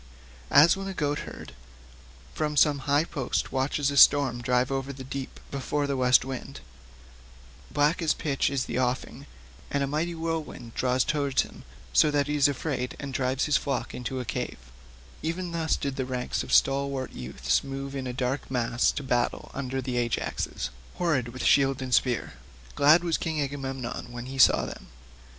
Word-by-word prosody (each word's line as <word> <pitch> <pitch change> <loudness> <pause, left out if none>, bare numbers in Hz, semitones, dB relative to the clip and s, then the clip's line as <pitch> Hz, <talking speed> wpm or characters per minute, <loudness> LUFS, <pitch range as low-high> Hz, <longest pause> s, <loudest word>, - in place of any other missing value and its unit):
As 150 +6 +7
when 195 0 -5
a 195 - -5
goat 145 -2 0
herd - - -10 0.8
from 150 -1 -2
some 145 +1 +4
high 145 +2 +4
post 140 -7 -2
watches 140 +2 0
a 140 - -3
storm 135 -5 +6
drive 125 +2 +1
over 135 0 -2
the 135 -1 -8
deep 135 0 -6
before 145 +1 -1
the 140 -1 -1
west 130 0 +4
wind—black 65 - -5
as 160 -2 +2
pitch 140 -3 0
is 140 -2 -1
the - - -2
offing 125 0 -2 0.4
and 140 -1 0
a - - +2
mighty 155 +5 -2
whirlwind 160 -8 -4
draws 125 0 +1
towards 145 -3 +1
him, - - -13 0.3
so 155 - +5
that 145 -1 +1
he 150 +1 -2
is 145 -1 +5
afraid 135 -3 -3
and 140 -2 -6
drives 130 +1 0
his 150 -1 +3
flock 135 -3 -3
into 125 +1 -4
a 125 - -4
cave—even 60 - -6
thus 165 -1 0
did 140 -2 -3
the 130 - -1
ranks 125 -1 -2
of - - -7
stalwart 135 -1 +2
youths 65 +1 -1
move 135 0 -5
in 130 -1 -3
a - - -2
dark 125 +2 -2
mass 120 -2 +1
to 145 - -5
battle 125 -2 -1
under 135 -1 -3
the 125 -1 -2
Ajaxes, 120 -1 -2 0.2
horrid 155 -9 +1
with 125 +2 -6
shield 135 -1 +4
and 130 -1 -4
spear. 120 - +1 0.4
Glad 155 +4 +5
was 170 -2 0
King 160 -2 -2
Agamemnon 135 -4 -4
when 120 0 -6
he 135 +1 -7
saw - - +6
them. - - -9
135 Hz, 175 wpm, -27 LUFS, 125-145 Hz, 0.8 s, As